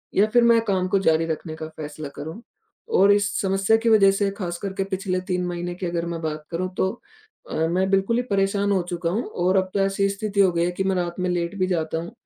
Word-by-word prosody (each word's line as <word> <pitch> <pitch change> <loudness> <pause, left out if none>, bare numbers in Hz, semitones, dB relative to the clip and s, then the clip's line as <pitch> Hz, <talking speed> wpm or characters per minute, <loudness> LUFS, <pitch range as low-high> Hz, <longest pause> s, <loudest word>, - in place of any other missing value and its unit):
या 205 +2 +5
फिर 240 -1 +5
मैं 230 -1 +5
काम 185 -3 +1
को 195 +1 +2
जारी 160 -3 +2
रखने 160 0 -4
का 155 0 -6
फैसला 150 -1 -6
करूँ? 160 +10 -7 0.5
और 200 - +5
इस 205 0 +2 0.2
समस्या 195 +2 +2
की 230 0 0
वजह 200 -3 +6
से 195 0 0
खासकर 190 0 -5
के 195 0 -1
पिछले 190 -1 -2
3 180 -1 -2
महीने 175 0 -4
की 185 - -5
अगर 170 -1 -2
मैं 170 -1 -4
बात 155 -1 -4
करूँ 185 +2 -2
तो 190 - +2 0.6
अ, - - -4
मैं 185 +3 +1
बिल्कुल 195 +5 +2
ही 250 - +1
परेशान 200 +1 +1
हो 190 -2 +2
चुका 170 -1 -2
हूँ 220 +7 -1 0.2
और 185 +2 +3
अब 185 0 +1
तो 200 - 0
ऐसी 195 0 +1
स्थिति 200 0 -3
हो 185 -2 +5
गई 170 0 +1
है 180 - 0
कि 190 +2 -2
मैं 190 -1 +1
रात 175 -1 -2
में 180 0 0
लेट 175 +1 -1
भी 185 - +2
जाता 160 -3 -1
हूँ, 170 +6 -5
185 Hz, 250 wpm, -23 LUFS, 170-200 Hz, 0.6 s, वजह